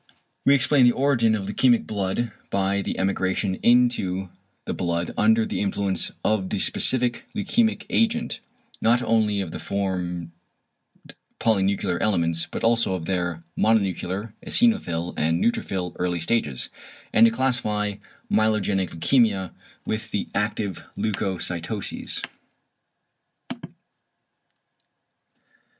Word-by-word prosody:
=We 140 Hz, -, +6 dB
explain 140 Hz, 0 st, +4 dB
the 120 Hz, -, +5 dB
origin 125 Hz, -5 st, +2 dB
of 100 Hz, -3 st, -4 dB
leukæmic 120 Hz, +2 st, +3 dB
blood 105 Hz, +3 st, -2 dB, 0.2 s
by 100 Hz, 0 st, 0 dB
the -, -, -3 dB
emigration 95 Hz, 0 st, 0 dB
into 120 Hz, -7 st, +2 dB, 0.4 s
the -, -, -3 dB
blood 85 Hz, -1 st, -2 dB
under 225 Hz, 0 st, +4 dB
the 220 Hz, -, -3 dB
influence 100 Hz, -2 st, -1 dB
of 100 Hz, -3 st, +1 dB
the -, -, -1 dB
specific 125 Hz, -2 st, +1 dB
leukæmic 220 Hz, +2 st, +1 dB
agent, 230 Hz, 0 st, +1 dB, 0.4 s
not 120 Hz, +2 st, +3 dB
only 110 Hz, -3 st, +2 dB
of 90 Hz, -4 st, -5 dB
the -, -, -6 dB
formed 90 Hz, -4 st, -3 dB, 1.1 s
polynuclear 100 Hz, -4 st, +1 dB
elements, 85 Hz, -5 st, +1 dB
but -, -, -5 dB
also 115 Hz, -4 st, +2 dB
of 85 Hz, -3 st, -5 dB
their 90 Hz, -2 st, -2 dB
mononuclear, 100 Hz, -1 st, 0 dB
eosinophil 90 Hz, -, +1 dB
and 80 Hz, +2 st, +1 dB
neutrophil 95 Hz, -5 st, -1 dB
early 90 Hz, -1 st, 0 dB
stages; 80 Hz, -, -1 dB, 0.4 s
and 115 Hz, +1 st, +7 dB
to -, -, +2 dB
classify 110 Hz, -5 st, 0 dB, 0.3 s
myelogenic 105 Hz, -4 st, +1 dB
leukæmia 100 Hz, +1 st, +2 dB, 0.3 s
with 110 Hz, +1 st, -3 dB
the 105 Hz, -, -3 dB
active 105 Hz, -2 st, -2 dB
leucocytoses. 95 Hz, -1 st, -3 dB
100 Hz, 110 wpm, -24 LUFS, 95-115 Hz, 1.1 s, and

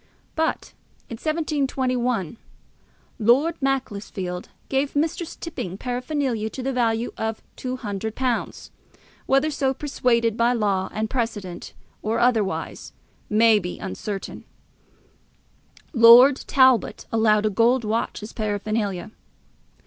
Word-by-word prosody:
But 320 Hz, 0 st, -1 dB, 0.4 s
in 230 Hz, -, -5 dB
1721 260 Hz, -, -1 dB, 0.8 s
Lord 265 Hz, +9 st, +3 dB
Macclesfield 205 Hz, -9 st, -3 dB, 0.2 s
gave 275 Hz, +1 st, -1 dB
Mistress 320 Hz, +3 st, -1 dB
Tipping 195 Hz, -, -6 dB
paraphernalia 250 Hz, -2 st, -2 dB
to 255 Hz, -, -7 dB
the 270 Hz, +1 st, -1 dB
value 230 Hz, -1 st, 0 dB
of 220 Hz, 0 st, -3 dB
£200, 235 Hz, 0 st, -3 dB, 0.6 s
whether 275 Hz, +3 st, +3 dB
so 270 Hz, -2 st, 0 dB
persuaded 235 Hz, -6 st, +1 dB
by 235 Hz, +1 st, +2 dB
law 200 Hz, -5 st, 0 dB
and 215 Hz, +1 st, -2 dB
precedent, 215 Hz, -7 st, -4 dB, 0.3 s
or 220 Hz, +2 st, -1 dB
otherwise, 225 Hz, -5 st, 0 dB, 0.4 s
may 220 Hz, 0 st, +5 dB
be 180 Hz, -2 st, -6 dB
uncertain. 195 Hz, -, -6 dB, 1.5 s
Lord 245 Hz, +3 st, +8 dB
Talbot 260 Hz, -3 st, +3 dB
allowed 215 Hz, -2 st, +3 dB
a 215 Hz, -, +1 dB
gold 235 Hz, +5 st, +3 dB
watch 215 Hz, 0 st, -2 dB
as 210 Hz, -, -8 dB
paraphernalia. 210 Hz, -2 st, -2 dB
230 Hz, 105 wpm, -23 LUFS, 215-265 Hz, 1.5 s, Lord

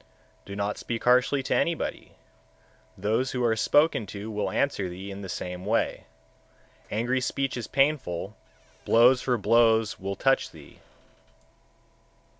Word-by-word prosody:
133. -, -, -10 dB
Do -, -, -5 dB
not 100 Hz, +1 st, -2 dB
speak 115 Hz, -1 st, -4 dB
harshly 125 Hz, +2 st, +3 dB
to -, -, -1 dB
anybody; 170 Hz, -2 st, -2 dB, 0.8 s
those 115 Hz, +5 st, 0 dB
who 125 Hz, -1 st, -1 dB
are 115 Hz, -2 st, +2 dB
spoken 130 Hz, -1 st, +2 dB
to 105 Hz, +3 st, -7 dB
will 105 Hz, -1 st, -2 dB
answer 100 Hz, -9 st, -1 dB
thee 95 Hz, +3 st, -8 dB
in 100 Hz, +1 st, -8 dB
the 95 Hz, -, -7 dB
same 90 Hz, 0 st, -5 dB
way. 110 Hz, +4 st, -1 dB, 0.8 s
Angry 120 Hz, +4 st, 0 dB
speech 135 Hz, +1 st, -2 dB
is 120 Hz, -3 st, -5 dB
painful, 130 Hz, -, 0 dB, 0.5 s
blows 125 Hz, +3 st, +5 dB
for 125 Hz, -2 st, 0 dB
blows 115 Hz, 0 st, +3 dB
will 100 Hz, +1 st, -4 dB
touch 135 Hz, +6 st, +1 dB
thee. -, -, -16 dB
115 Hz, 140 wpm, -26 LUFS, 100-130 Hz, 0.8 s, blows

